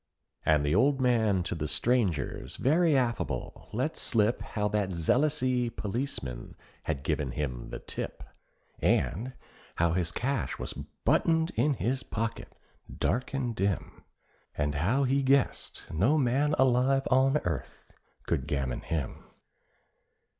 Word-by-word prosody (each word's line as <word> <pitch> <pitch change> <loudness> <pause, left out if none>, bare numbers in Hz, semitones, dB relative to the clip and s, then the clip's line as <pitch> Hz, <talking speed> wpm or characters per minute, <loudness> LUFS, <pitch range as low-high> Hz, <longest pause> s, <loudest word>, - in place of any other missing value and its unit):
And 75 -2 +3
the 75 - +1
old 135 +8 +3
man 110 -7 +2
to 85 - -3
the 75 -2 -3
strangers 100 - 0
very 155 +2 +3
affable 115 - -2
let - - -1
slip 110 +1 +1
How 105 -1 -2
that 105 -2 0
zealousy 125 - +1
policeman 100 - -4 0.3
had 70 -4 -2
given - - -1
him 65 -5 -4
the - - -5
tip, - - -5 0.6
And 115 - +1 0.4
how 85 0 +2
his 85 -2 0
cash 125 +5 -2
was - - -5
buttoned 160 0 +1
in 140 +5 +1
his 130 +3 -1
pocket 115 +1 -4 0.4
dark 125 +3 -1
and 125 -4 -1
dim, 100 0 -2 0.5
And 75 0 0
how 100 - +1
he 135 +1 +2
guessed 135 0 +1
no 110 - +3
man 140 +2 +2
alive 130 +1 +3
on 135 +3 +4
earth 80 - -4 0.4
could 65 - -1
gammon 65 -4 -1
him. 80 -5 -4
115 Hz, 130 wpm, -29 LUFS, 80-135 Hz, 0.6 s, on